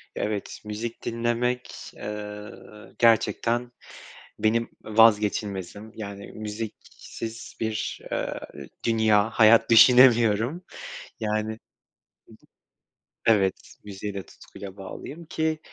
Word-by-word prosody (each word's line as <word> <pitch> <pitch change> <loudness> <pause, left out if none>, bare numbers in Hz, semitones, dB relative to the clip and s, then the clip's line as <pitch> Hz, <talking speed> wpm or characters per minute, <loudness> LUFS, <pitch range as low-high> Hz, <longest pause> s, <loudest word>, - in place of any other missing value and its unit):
Evet, 105 -1 -3
müzik 110 +2 -5
dinlemek, 120 +2 -2
eee, 105 0 -6 0.5
gerçekten 120 +1 +2 0.7
benim 115 +2 +1
vazgeçilmezim, 105 -1 +2
yani 100 -2 -8
müziksiz 110 +1 -7
bir, 110 -1 -2
eee, - - -2 0.4
dünya, 110 -2 +3
hayat 115 +1 +5
düşünemiyorum. 120 - +6 0.6
Yani, 110 0 -1
hı - - -4
hı - - -21 1.7
Evet, 100 -4 +2
müziğe 100 0 -6
de 95 -1 -5
tutkuyla 100 +3 -12
bağlıyım, 140 - -8
ki 160 -1 -1
110 Hz, 90 wpm, -26 LUFS, 105-115 Hz, 1.7 s, düşünemiyorum